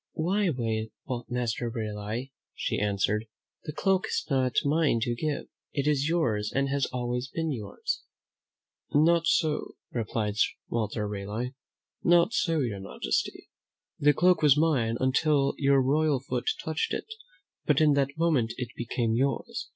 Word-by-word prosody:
"Why, 185 Hz, +4 st, +1 dB, 0.8 s
Master 120 Hz, -1 st, -1 dB
Raleigh," 110 Hz, +3 st, -4 dB, 0.2 s
she -, -, -1 dB
answered, 105 Hz, +2 st, 0 dB, 0.4 s
"the -, -, -3 dB
cloak 190 Hz, +4 st, +1 dB
is -, -, -1 dB
not 130 Hz, -2 st, +1 dB
mine 150 Hz, -4 st, +3 dB
to 120 Hz, -, 0 dB
give; 145 Hz, +4 st, -2 dB, 0.3 s
it 140 Hz, -1 st, -1 dB
is 145 Hz, 0 st, +2 dB
yours 110 Hz, -11 st, +1 dB
and 135 Hz, 0 st, 0 dB
has 140 Hz, -1 st, +1 dB
always 125 Hz, 0 st, -2 dB
been 160 Hz, +3 st, -2 dB
yours." 105 Hz, -7 st, -3 dB, 0.9 s
"Not 165 Hz, +3 st, +4 dB
so," 155 Hz, -2 st, +1 dB, 0.2 s
replied 110 Hz, -2 st, -2 dB, 0.3 s
Walter 110 Hz, -2 st, -1 dB
Raleigh; 105 Hz, +5 st, -4 dB, 0.5 s
"not 175 Hz, +5 st, +4 dB
so, 165 Hz, -, +1 dB
your 110 Hz, -6 st, -2 dB
majesty. 95 Hz, -10 st, -3 dB, 0.5 s
The 145 Hz, 0 st, +5 dB
cloak 180 Hz, +1 st, +4 dB
was 150 Hz, -2 st, +6 dB
mine 130 Hz, -8 st, +2 dB
until 140 Hz, +1 st, +2 dB
your 140 Hz, -1 st, +4 dB
royal 145 Hz, +2 st, +2 dB
foot 125 Hz, -2 st, -2 dB, 0.2 s
touched 160 Hz, 0 st, -1 dB
it, -, -, -4 dB, 0.6 s
but -, -, +4 dB
in 155 Hz, -2 st, +5 dB
that 140 Hz, +1 st, 0 dB
moment 145 Hz, -9 st, +2 dB
it 125 Hz, -2 st, -4 dB
became 115 Hz, -1 st, -1 dB
yours. 135 Hz, +4 st, -1 dB
135 Hz, 140 wpm, -28 LUFS, 115-155 Hz, 0.9 s, was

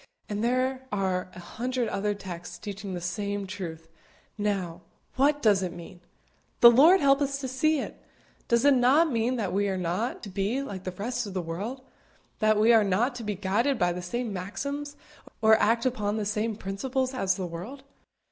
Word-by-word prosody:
and 210 Hz, +1 st, -3 dB
there 255 Hz, +2 st, 0 dB
are 190 Hz, -2 st, -1 dB
a -, -, -9 dB
hundred 245 Hz, +6 st, -3 dB
other 205 Hz, +1 st, -1 dB
texts 180 Hz, -3 st, -8 dB
teaching 195 Hz, -2 st, -6 dB
the -, -, -3 dB
same 200 Hz, +3 st, -3 dB
truth. 170 Hz, -4 st, -7 dB, 0.5 s
Now, 195 Hz, -5 st, -2 dB, 0.3 s
what 290 Hz, +2 st, +2 dB
does 205 Hz, -4 st, +4 dB
it 180 Hz, -2 st, -2 dB
mean? 175 Hz, 0 st, -11 dB, 0.6 s
The 235 Hz, -, +11 dB
Lord 315 Hz, +10 st, +6 dB
help 275 Hz, 0 st, +4 dB
us 275 Hz, -1 st, -1 dB
to 270 Hz, -, -4 dB
see 305 Hz, +5 st, +1 dB
it! -, -, -7 dB, 0.5 s
Does 235 Hz, +2 st, +2 dB
it 285 Hz, -, +7 dB
not 270 Hz, +6 st, +4 dB
mean 235 Hz, +2 st, 0 dB
that 210 Hz, -7 st, -2 dB
we 200 Hz, +1 st, +1 dB
are 190 Hz, -, -1 dB
not 180 Hz, +7 st, -2 dB
to 205 Hz, -, -6 dB
be 200 Hz, +8 st, -1 dB
like 195 Hz, -8 st, -7 dB
the 185 Hz, -, -2 dB
rest 230 Hz, +4 st, -3 dB
of 195 Hz, -, -8 dB
the -, -, 0 dB
world? 200 Hz, +11 st, -5 dB, 0.6 s
that 215 Hz, -1 st, +3 dB
we 225 Hz, +2 st, +6 dB
are 225 Hz, -2 st, +6 dB
not 210 Hz, +7 st, +1 dB
to 235 Hz, -, -6 dB
be 210 Hz, -1 st, -2 dB
guided 210 Hz, +8 st, 0 dB
by 175 Hz, -3 st, +1 dB
the 180 Hz, -, -5 dB
same 230 Hz, +5 st, -3 dB
maxims, 280 Hz, +10 st, -5 dB, 0.4 s
or 220 Hz, 0 st, +6 dB
act 230 Hz, +3 st, +2 dB
upon 215 Hz, -4 st, 0 dB
the 215 Hz, -, -2 dB
same 215 Hz, +2 st, -1 dB
principles 255 Hz, +7 st, -2 dB
as 195 Hz, -8 st, +1 dB
the 185 Hz, -, -4 dB
world? 185 Hz, +12 st, -8 dB
210 Hz, 195 wpm, -27 LUFS, 190-255 Hz, 0.6 s, The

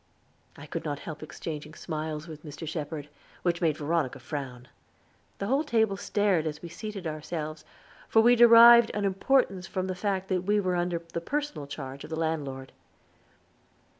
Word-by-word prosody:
I -, -, -10 dB
could -, -, -5 dB
not 145 Hz, -1 st, -3 dB
help 155 Hz, -2 st, -7 dB
exchanging 155 Hz, 0 st, -7 dB
smiles 155 Hz, -1 st, -5 dB
with 155 Hz, -2 st, -10 dB
Mr. 155 Hz, +1 st, -8 dB
Shepherd, 150 Hz, -2 st, -4 dB, 0.4 s
which 175 Hz, -1 st, 0 dB
made 160 Hz, -3 st, +2 dB
Veronica 150 Hz, -3 st, -1 dB
frown. 130 Hz, -1 st, -6 dB, 0.7 s
The 200 Hz, -, -3 dB
whole 270 Hz, +8 st, +2 dB
table 220 Hz, -8 st, +2 dB
stared 195 Hz, -5 st, +1 dB
as 150 Hz, -1 st, -4 dB
we 170 Hz, -, -6 dB
seated 200 Hz, +2 st, -7 dB
ourselves, 155 Hz, 0 st, -5 dB, 0.5 s
for 225 Hz, -, +5 dB
we 240 Hz, +1 st, +6 dB
derived 235 Hz, 0 st, +9 dB
an 205 Hz, -1 st, 0 dB
importance 195 Hz, -1 st, +1 dB
from 185 Hz, 0 st, -2 dB
the 190 Hz, -, -2 dB
fact 190 Hz, 0 st, -2 dB
that 185 Hz, -2 st, +1 dB
we 205 Hz, +3 st, +2 dB
were 185 Hz, -2 st, 0 dB
under 175 Hz, 0 st, 0 dB, 0.2 s
the 170 Hz, -, -2 dB
personal 290 Hz, -, -3 dB
charge 140 Hz, -1 st, -7 dB
of -, -, -9 dB
the 160 Hz, -, -3 dB
landlord. 145 Hz, -5 st, -3 dB
170 Hz, 165 wpm, -28 LUFS, 150-200 Hz, 0.7 s, derived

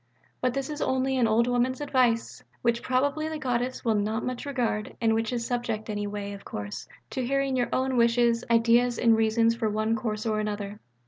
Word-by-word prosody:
But 250 Hz, 0 st, 0 dB
this 275 Hz, +2 st, -2 dB
is 300 Hz, -, -5 dB
only 260 Hz, 0 st, +1 dB
an 240 Hz, -3 st, +3 dB
old 225 Hz, +2 st, +3 dB
woman's 245 Hz, +1 st, +1 dB
advice: 255 Hz, -5 st, +1 dB, 0.2 s
which 235 Hz, -1 st, +2 dB
probably 285 Hz, +5 st, 0 dB
the 315 Hz, -, -4 dB
Goddess 250 Hz, -3 st, -2 dB
will 225 Hz, -, +3 dB
not 215 Hz, +2 st, -1 dB
much 255 Hz, +2 st, -4 dB
regard 240 Hz, -6 st, -2 dB
and 225 Hz, -1 st, +2 dB
which 225 Hz, +1 st, 0 dB
is 235 Hz, -2 st, -2 dB
subject 230 Hz, -3 st, -2 dB
any 205 Hz, 0 st, -2 dB
way, 205 Hz, 0 st, -5 dB
of 200 Hz, -, -10 dB
course, 105 Hz, 0 st, -6 dB, 0.2 s
to 260 Hz, -, -2 dB
hearing 275 Hz, +1 st, 0 dB
your 245 Hz, -1 st, 0 dB
own 260 Hz, 0 st, 0 dB
wishes, 235 Hz, 0 st, +3 dB
ideas 235 Hz, +1 st, +4 dB
and 230 Hz, -2 st, +4 dB
reasons 225 Hz, +1 st, +3 dB
for 225 Hz, -2 st, -1 dB
one 215 Hz, +2 st, 0 dB
course 215 Hz, -1 st, -3 dB
or 215 Hz, -1 st, 0 dB
another.... 205 Hz, -1 st, -4 dB
235 Hz, 200 wpm, -27 LUFS, 220-255 Hz, 0.2 s, ideas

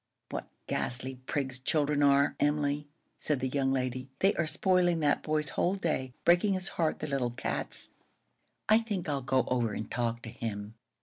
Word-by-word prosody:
"What -, -, -4 dB, 0.2 s
ghastly 130 Hz, +1 st, -2 dB
prigs 135 Hz, -3 st, -1 dB
children 145 Hz, +2 st, +1 dB
are, 140 Hz, 0 st, +4 dB
Emily!" 145 Hz, 0 st, +1 dB, 0.3 s
said 150 Hz, -4 st, 0 dB
the 130 Hz, -, 0 dB
young 135 Hz, 0 st, +1 dB
lady. 130 Hz, 0 st, -2 dB
"They 195 Hz, +6 st, +3 dB
are 170 Hz, -, 0 dB
spoiling 175 Hz, 0 st, +3 dB
that 145 Hz, -1 st, +2 dB
boy's 155 Hz, -2 st, 0 dB
whole 180 Hz, +6 st, +1 dB
day, 135 Hz, -9 st, -2 dB
breaking 175 Hz, +4 st, +5 dB
his 185 Hz, 0 st, -3 dB
heart, 160 Hz, -2 st, 0 dB
the -, -, -4 dB
little 135 Hz, -4 st, 0 dB
cats! 120 Hz, -, -2 dB, 0.8 s
I 215 Hz, +1 st, +6 dB
think 210 Hz, -6 st, -3 dB
I'll 140 Hz, -2 st, -1 dB
go 130 Hz, 0 st, +2 dB
over 120 Hz, -4 st, +1 dB
and 110 Hz, -, -5 dB
talk 120 Hz, -1 st, -1 dB
to -, -, -6 dB
him." 110 Hz, -3 st, -5 dB
140 Hz, 175 wpm, -30 LUFS, 125-160 Hz, 0.8 s, I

